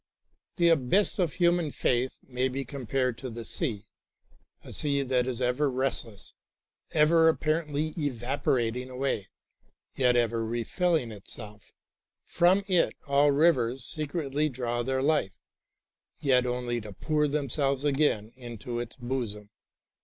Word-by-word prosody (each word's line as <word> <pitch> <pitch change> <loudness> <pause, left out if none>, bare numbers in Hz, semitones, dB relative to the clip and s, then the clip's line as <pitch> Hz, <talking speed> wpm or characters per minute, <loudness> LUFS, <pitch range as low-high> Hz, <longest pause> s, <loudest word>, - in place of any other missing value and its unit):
The 170 -2 +4
abyss 165 +8 +2
of 175 -4 +1
human 175 -2 +2
faith 130 -2 0
may 125 0 -1
be 135 +1 -4
compared 130 -2 -2
to 130 - -5
the 115 0 -7
sea, 110 - -3 0.8
a - - -10
sea 140 -2 +1
that 125 -1 +1
is 130 -1 -2
ever 125 +4 +1
restless, 125 -5 -3 0.6
ever 160 +1 +4
apparently 155 -1 0
evaporating 125 -3 -1
away, 130 -6 -2 0.7
yet 125 -2 +3
ever 115 -1 +1
refilling 120 - 0
itself. 105 0 -6 0.5
From 185 +3 +3
it 185 -3 +2
all 140 0 +4
rivers 135 -5 +2
secretly 150 -1 -1
draw 120 -2 -2
their 130 +2 -1
life, 145 -10 +1 0.9
yet 130 -3 +3
only 125 -1 -2
to 105 -1 -9
pour 150 +8 0
themselves 140 -1 -1
again 135 -7 +1
into 120 -1 -6
its 120 -1 -6
bosom. 120 -5 -4
130 Hz, 125 wpm, -28 LUFS, 120-150 Hz, 0.9 s, The